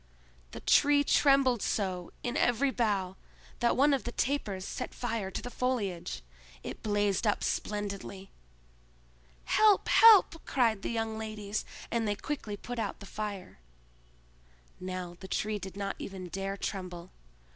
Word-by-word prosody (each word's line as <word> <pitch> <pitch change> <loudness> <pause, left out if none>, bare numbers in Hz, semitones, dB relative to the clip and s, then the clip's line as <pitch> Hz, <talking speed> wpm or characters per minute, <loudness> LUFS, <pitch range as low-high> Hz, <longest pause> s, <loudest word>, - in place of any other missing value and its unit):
The - - -9
Tree 285 0 +5
trembled 275 -5 +4
so 185 -4 -2
in 245 - -2
every 245 +3 +2
bough 200 -6 0 0.4
that 240 -1 +2
one 285 +2 +5
of 270 - 0
the 240 - -4
tapers 225 -9 -1
set - - -5
fire 225 -5 -2
to 195 - -5
the 245 - -6
foliage. 200 - -2 0.4
It - - -7
blazed 205 0 +1
up 205 - +1
splendidly. 200 -2 -3 1.1
"Help! 425 -2 +4
help!" 410 -7 +7
cried 230 -6 +1
the - - -3
young 225 -1 -2
ladies, 215 -1 -4 0.3
and 230 -1 0
they 205 - +1
quickly 220 -4 -4
put 245 +2 -6
out 210 -3 -3
the - - -10
fire. 200 - -6 1.2
Now 185 -1 -5
the 190 - -9
Tree 210 +2 -1
did 190 -1 -8
not 200 -1 -3
even 185 -2 -7
dare 195 +2 -3
tremble. 180 -3 -5
210 Hz, 145 wpm, -30 LUFS, 195-245 Hz, 1.2 s, help